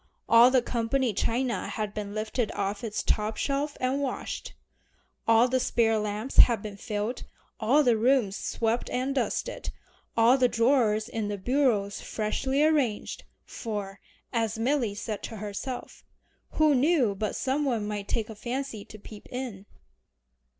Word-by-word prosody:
All 235 +2 +8
the 255 -2 +3
company 240 +1 0
china 235 0 -1
had 215 -2 -3
been 205 -1 -5
lifted 215 +2 -1
off 200 +1 -3
its 215 -2 -3
top 215 0 0
shelf 285 +1 -1
and 260 +2 0
washed. 270 -3 -4 0.7
All 230 +2 +6
the 260 +1 +1
spare 225 -3 +2
lamps 210 +4 -4
had 230 -5 +7
been 210 -2 -6
filled, 210 +3 -3 0.4
all 260 +7 +4
the 245 -4 +4
rooms 230 -3 +2
swept 230 +2 -1
and 260 +2 -1
dusted, 280 - -2 0.5
all 235 +4 +5
the 250 - +5
drawers 230 -3 +2
in 225 -3 -3
the 205 0 -3
bureaus 220 -3 +1
freshly 265 +6 -1
arranged, 285 -9 0 0.2
for 205 -4 -5 0.3
as 225 -2 0
Milly 235 -3 0
said 210 0 -4
to 225 - -6
herself 210 +5 -6 0.5
"who 310 -1 +4
knew 270 -5 +3
but 210 +2 -3
some 275 +3 0
one 235 -7 0
might 205 -1 -4
take 225 -1 -2
a - - -6
fancy 240 0 -4
to 215 - -12
peep 210 0 -12
in?" 240 -6 -6
230 Hz, 150 wpm, -27 LUFS, 210-260 Hz, 0.7 s, All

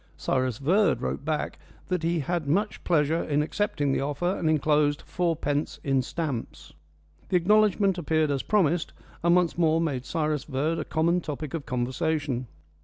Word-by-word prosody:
Cyrus 130 -3 0
Verd 185 +9 +2
wrote - - -3
back 155 0 -2 0.3
that 180 -2 0
he 165 0 0
had 170 +1 -2
much 205 +8 0
pleasure 160 -1 +2
in 150 0 +1
accepting 150 -5 -1
the - - 0
offer, 145 +4 -2
and 160 - 0
enclosed 150 -1 +2
fourpence 160 -4 -1
in 135 -2 +2
stamps. 140 -2 -5 0.6
The 180 - +4
acknowledgment 200 0 +3
appeared 155 -2 +1
as 135 -2 0
promised, 175 -5 +1 0.3
and 170 +1 +4
once 175 -1 +1
more 160 -1 +3
made 140 -6 -1
Cyrus 155 0 -1
Verd 150 +4 -1
a - - -3
common 170 +3 +1
topic 150 -2 -5
of 160 -5 -4
conversation. 130 +1 -1
155 Hz, 160 wpm, -26 LUFS, 145-170 Hz, 0.6 s, The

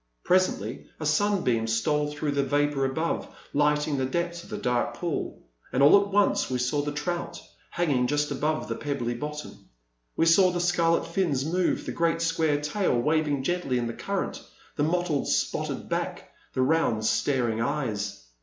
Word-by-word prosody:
Presently 145 - +1
a 155 - -4
sunbeam 150 - +1
stole 145 +7 +1
through 150 0 -2
the 140 0 +1
vapour 145 0 +1
above, 160 +5 -1 0.3
light 150 0 +2
ing 145 -2 -1
the 130 - +1
depths 170 +4 -2
of - - -15
the - - -4
dark 125 -1 0
pool. 170 -4 -4 0.3
And 135 - +2
all 175 +8 +8
at 200 - -2
once 200 0 +2
we 130 - 0
saw 125 +4 0
the 145 0 -3
trout, 160 +4 -3 0.3
hanging 140 -8 +1
just 145 +2 0
above 155 +3 -1
the 115 - -2
pebbly 125 -1 -2
bottom; 150 +4 -7 0.5
we 165 - +2
saw 185 +3 +6
the 175 0 -2
scarlet 170 -1 +2
fins 165 -6 0
move, 175 +3 0
the - - -3
great 165 0 +1
square 160 -3 +1
tail 150 -3 0
waving 150 0 +1
gently 175 -5 0
in 120 - -1
the 115 - -3
current, 200 +8 -3 0.3
the - - -2
mot 175 +4 +1
tled 150 -5 -1
spotted - - -1
back, - - -3 0.2
the 130 - +2
round 130 -7 +1
staring 120 -2 +1
eyes. 110 - -2
150 Hz, 175 wpm, -27 LUFS, 130-170 Hz, 0.5 s, all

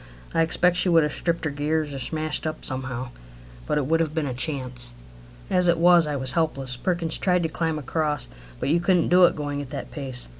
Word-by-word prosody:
I 165 - +2
expect 175 +2 +3
she 180 - +2
would 165 -2 +5
have 150 -1 -1
stripped 170 -1 -2
her 155 - -1
gears 150 +1 -1
or 135 - -5
smashed 155 +3 -3
up 155 - -5
somehow, 130 -1 -4 0.6
but - - 0
it 145 - 0
would 165 +4 +2
have 160 -1 -1
been 160 -2 0
a 130 - -3
chance. 125 -3 -1 0.6
As 180 -1 +2
it 170 -1 +4
was, 170 -1 +5
I 150 - -2
was 130 -1 +1
helpless. 135 -5 -1
Perkins 170 +4 -1
tried 180 -2 +2
to 165 - 0
climb 160 0 -2
across, 150 0 -2 0.3
but - - -1
you 165 +3 +3
couldn't 175 -1 +2
do 180 0 +7
it - - +2
going 145 -1 -3
at 140 - -8
that - - -6
pace. 130 -4 -3
155 Hz, 225 wpm, -24 LUFS, 140-170 Hz, 0.6 s, do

